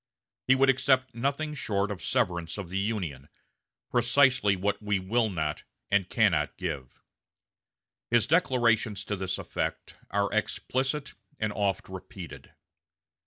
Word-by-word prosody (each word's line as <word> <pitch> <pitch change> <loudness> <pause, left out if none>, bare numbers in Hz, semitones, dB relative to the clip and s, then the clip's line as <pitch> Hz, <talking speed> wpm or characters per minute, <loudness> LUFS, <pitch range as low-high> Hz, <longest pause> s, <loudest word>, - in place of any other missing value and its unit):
He 130 - +6
would 135 0 +5
accept 130 0 +2
nothing 140 +5 -1
short 105 -7 -1
of 95 - -6
severance 90 -10 0
of 100 -4 -6
the 95 +2 -1
Union 90 -10 -3 0.6
precisely 120 -3 +4
what 100 +3 -1
we 105 -1 +1
will 110 +5 +1
not 75 -5 -2 0.3
and 100 -2 +2
cannot - - +2
give. 75 -9 -5 1.1
His 120 -3 +4
declarations 120 - +2
to 105 - -2
this 95 -1 -2
effect - - -4
are 100 0 0
explicit 135 +6 -1 0.2
and 110 -1 -1
oft 100 -3 -1
repeated.... 95 - -9
105 Hz, 125 wpm, -28 LUFS, 95-125 Hz, 1.1 s, He